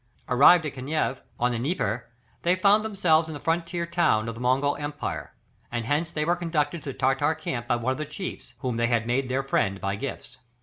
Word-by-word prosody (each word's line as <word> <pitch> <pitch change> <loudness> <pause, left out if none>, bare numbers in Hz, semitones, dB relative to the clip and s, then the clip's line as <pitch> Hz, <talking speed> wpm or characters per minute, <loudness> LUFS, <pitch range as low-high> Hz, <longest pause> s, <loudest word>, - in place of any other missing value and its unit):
Arrived 150 +6 +6
at 150 - -3
Kaniev, 135 0 -2 0.2
on 125 +1 +2
the 120 - -2
Dnieper, 120 - -1 0.3
they 175 +2 +3
found 200 +3 +4
themselves 175 -7 +2
in 160 - -6
the - - -6
frontier 170 +2 -1
town 170 -10 +2
of 115 - -3
the 115 - -9
Mongol 135 +3 +2
empire, 145 0 -5 0.4
and 120 -1 -2
hence 155 +6 0
they 150 -2 -1
were 175 +2 +2
conducted 165 -2 -1
to 140 - -5
the - - -13
Tartar 135 +4 +2
camp 120 -6 -4
by - - +2
one 120 +2 -1
of 130 - -3
the 155 - -2
chiefs, 180 +5 -7
whom 125 -4 -2
they 120 0 +2
had 120 -2 +1
made 125 +2 0
their 130 +2 0
friend 100 -7 0
by 100 0 -1
gifts. 130 +2 -6
145 Hz, 220 wpm, -26 LUFS, 125-165 Hz, 0.4 s, Arrived